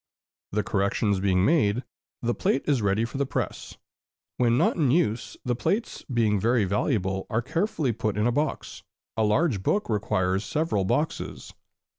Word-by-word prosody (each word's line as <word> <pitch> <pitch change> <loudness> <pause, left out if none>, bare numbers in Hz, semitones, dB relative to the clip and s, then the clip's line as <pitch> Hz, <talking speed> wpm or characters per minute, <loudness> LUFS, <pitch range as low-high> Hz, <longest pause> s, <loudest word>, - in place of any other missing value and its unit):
The 105 +1 0
corrections 100 0 0
being 95 -1 +2
made, 125 -7 +2 0.4
the 120 0 +1
plate 135 - 0
is 140 -5 +2
ready 100 +2 +1
for 130 +4 -6
the 140 - +2
press. - - -4 0.6
When 120 -1 +3
not - - +3
in 150 -7 +2
use, 125 -6 0
the 125 -1 0
plates, 215 - -1
being 110 -4 +2
very 115 +1 +2
valuable, 95 -1 -1
are 120 +1 0
carefully 160 - 0
put 110 -2 -2
in 105 - +1
a 120 - +3
box, 145 +4 -2 0.3
a 110 - +1
large 110 - +2
book 205 - 0
requiring 95 -3 +1
several 105 - -1
boxes. 150 +11 -2
115 Hz, 160 wpm, -26 LUFS, 100-135 Hz, 0.6 s, When